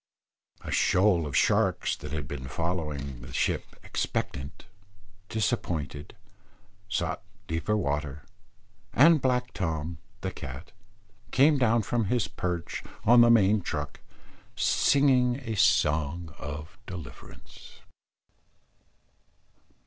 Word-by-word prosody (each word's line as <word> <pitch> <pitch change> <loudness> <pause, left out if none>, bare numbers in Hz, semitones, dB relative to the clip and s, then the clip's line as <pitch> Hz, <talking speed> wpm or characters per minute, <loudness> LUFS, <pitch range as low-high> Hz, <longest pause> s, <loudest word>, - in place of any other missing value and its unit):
A - - -7
shoal 90 -4 +3
of 70 - -1
sharks - - +2
that - - -8
had 75 -1 -3
been 65 +1 -6
following 75 -4 -3
the 60 +1 -10
ship - - -1
expectant, 70 +1 -3 0.6
disappointed, 85 - -2 0.7
sought 100 - -1 0.2
deeper 85 +7 -1
water, 75 -4 -2 0.7
and 155 +2 +6
black 125 -1 0
Tom, 80 -2 -3 0.2
the - - -2
cat, 65 +8 -8 0.6
came 140 +3 +4
down 115 -2 +3
from 115 +2 0
his 110 -1 +1
perch 90 -2 -3 0.2
on 120 +2 +7
the 120 - +7
main 105 -2 +5
truck, 75 -4 -4 0.6
singing 130 -3 +3
a 115 -2 -3
song 85 -6 +2
of 75 +4 -7
deliverance. 75 -8 -11
90 Hz, 105 wpm, -28 LUFS, 75-115 Hz, 0.7 s, on